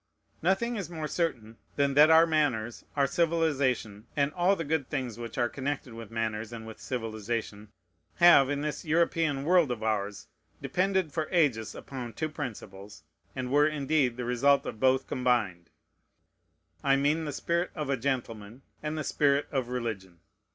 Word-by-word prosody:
Nothing 210 Hz, +7 st, +1 dB
is 190 Hz, -5 st, -4 dB
more 160 Hz, -3 st, -4 dB
certain 120 Hz, -11 st, -2 dB, 0.2 s
than 140 Hz, -1 st, +2 dB
that 150 Hz, +3 st, +7 dB
our 160 Hz, +1 st, +7 dB
manners, 140 Hz, -8 st, 0 dB
our 140 Hz, -1 st, +3 dB
civilization, 140 Hz, -9 st, 0 dB
and 140 Hz, 0 st, +1 dB
all 180 Hz, +2 st, +3 dB
the 165 Hz, -, -4 dB
good 150 Hz, -3 st, -1 dB
things 130 Hz, -6 st, -3 dB
which 115 Hz, -1 st, -7 dB
are 120 Hz, -1 st, +2 dB
connected 135 Hz, 0 st, -4 dB
with 115 Hz, -2 st, -9 dB
manners 115 Hz, -1 st, -3 dB
and 115 Hz, -1 st, -8 dB
with, 110 Hz, -1 st, -10 dB
civilization, 110 Hz, -3 st, -4 dB, 0.5 s
have, 170 Hz, -6 st, +7 dB
in 145 Hz, 0 st, -1 dB
this 150 Hz, 0 st, -3 dB
European 160 Hz, -3 st, +1 dB
world 170 Hz, -1 st, +4 dB
of 120 Hz, -3 st, -3 dB
ours, 105 Hz, -2 st, -2 dB, 0.3 s
depended 190 Hz, -3 st, 0 dB
for 155 Hz, -2 st, -1 dB
ages 130 Hz, -, +1 dB
upon 125 Hz, -4 st, -7 dB
two 155 Hz, -, -3 dB
principles, 105 Hz, -, -8 dB, 0.3 s
and 130 Hz, -1 st, -4 dB
were, 145 Hz, +1 st, +5 dB
indeed, 145 Hz, -4 st, 0 dB
the 125 Hz, -, -3 dB
result 135 Hz, +4 st, +3 dB
of 110 Hz, -, -6 dB
both 130 Hz, +1 st, +3 dB
combined: 115 Hz, -9 st, 0 dB, 1.1 s
I 135 Hz, -1 st, +4 dB
mean 150 Hz, +4 st, +1 dB
the 150 Hz, -, -3 dB
spirit 170 Hz, +5 st, -1 dB
of 150 Hz, -4 st, -3 dB
a -, -, +2 dB
gentleman, 120 Hz, -2 st, -4 dB, 0.2 s
and 155 Hz, 0 st, -3 dB
the 155 Hz, -, -2 dB
spirit 140 Hz, 0 st, +2 dB
of 130 Hz, -4 st, -1 dB
religion. 110 Hz, -8 st, -4 dB
135 Hz, 165 wpm, -29 LUFS, 115-155 Hz, 1.1 s, that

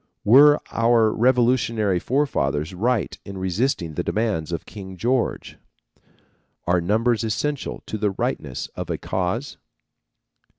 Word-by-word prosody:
Were 145 Hz, +7 st, +7 dB
our 115 Hz, -1 st, +3 dB
revolutionary 115 Hz, -5 st, +2 dB
forefathers 85 Hz, -, -1 dB
right 110 Hz, 0 st, 0 dB
in 100 Hz, -1 st, -8 dB
resisting 95 Hz, -, -1 dB
the -, -, -2 dB
demands 105 Hz, -8 st, -1 dB
of 85 Hz, -, -4 dB
King 95 Hz, -3 st, -9 dB
George? 120 Hz, +5 st, -1 dB, 1.1 s
Are 90 Hz, 0 st, +2 dB
numbers 110 Hz, +5 st, +1 dB
essential 120 Hz, +6 st, -3 dB
to 110 Hz, -, -5 dB
the 105 Hz, 0 st, +1 dB
rightness 95 Hz, -, -3 dB
of -, -, -5 dB
a -, -, -1 dB
cause? 95 Hz, +10 st, -3 dB
110 Hz, 120 wpm, -23 LUFS, 95-125 Hz, 1.1 s, Were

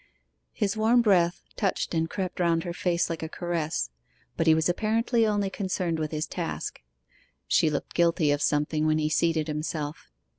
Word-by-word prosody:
His 200 Hz, 0 st, -1 dB
warm 230 Hz, +3 st, +4 dB
breath 180 Hz, -5 st, +3 dB
touched 195 Hz, -3 st, -1 dB
and 165 Hz, 0 st, 0 dB
crept 185 Hz, -1 st, -4 dB
round 165 Hz, -2 st, +2 dB
her 175 Hz, -, -4 dB
face 175 Hz, -1 st, 0 dB
like 165 Hz, -, -4 dB
a 160 Hz, -, -4 dB
caress; 160 Hz, -, -2 dB, 0.4 s
but -, -, 0 dB
he 160 Hz, -, +7 dB
was 160 Hz, 0 st, +2 dB
apparently 225 Hz, +5 st, +1 dB
only 205 Hz, -2 st, 0 dB
concerned 185 Hz, -5 st, -2 dB
with 155 Hz, -1 st, -1 dB
his 155 Hz, 0 st, -2 dB
task. -, -, -5 dB, 0.7 s
She 160 Hz, -, +3 dB
looked 145 Hz, -2 st, -4 dB
guilty 170 Hz, -3 st, +3 dB
of 145 Hz, 0 st, 0 dB
something 150 Hz, +1 st, +1 dB
when 155 Hz, 0 st, +3 dB
he 155 Hz, 0 st, 0 dB
seated 160 Hz, 0 st, +1 dB
himself. 150 Hz, -, -4 dB
170 Hz, 175 wpm, -27 LUFS, 155-190 Hz, 0.7 s, he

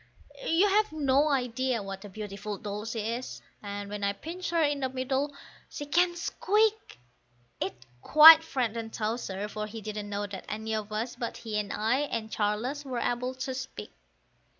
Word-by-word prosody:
You've 405 Hz, +5 st, +3 dB
no 285 Hz, -1 st, +3 dB
idea 255 Hz, -3 st, 0 dB
what 195 Hz, 0 st, -7 dB
a 205 Hz, -, -9 dB
beautiful 205 Hz, 0 st, -6 dB
doll 210 Hz, +2 st, -5 dB
she 225 Hz, 0 st, -3 dB
is, 230 Hz, +4 st, -4 dB, 0.2 s
and 205 Hz, 0 st, -5 dB
when 205 Hz, 0 st, -5 dB
I 200 Hz, 0 st, +1 dB
pinch 340 Hz, -, -6 dB
her 335 Hz, -1 st, +2 dB
in 290 Hz, -1 st, +1 dB
the 260 Hz, -1 st, -1 dB
middle, 265 Hz, +2 st, -1 dB, 0.4 s
she 290 Hz, -, -6 dB
can 345 Hz, +4 st, +2 dB
squeak; 425 Hz, -, 0 dB, 0.6 s
It 190 Hz, -, -2 dB, 0.3 s
quite 315 Hz, +2 st, +10 dB
frightened 230 Hz, -6 st, -2 dB
Towser, 215 Hz, -3 st, -3 dB
for 215 Hz, 0 st, -5 dB
he 225 Hz, +1 st, -7 dB
didn't 210 Hz, -1 st, -5 dB
know 205 Hz, 0 st, -2 dB
that 200 Hz, -2 st, -8 dB
any 220 Hz, +1 st, -3 dB
of 215 Hz, -1 st, -3 dB
us 225 Hz, +3 st, -3 dB
but 235 Hz, -, -4 dB
he 215 Hz, -2 st, -3 dB
and 205 Hz, -1 st, -3 dB
I 225 Hz, +5 st, +1 dB
and 230 Hz, -7 st, -3 dB
Charles 220 Hz, +8 st, -1 dB
were 260 Hz, -3 st, -4 dB
able 245 Hz, +2 st, -1 dB
to 260 Hz, 0 st, -4 dB
speak. 255 Hz, -, -7 dB
235 Hz, 175 wpm, -29 LUFS, 210-285 Hz, 0.6 s, quite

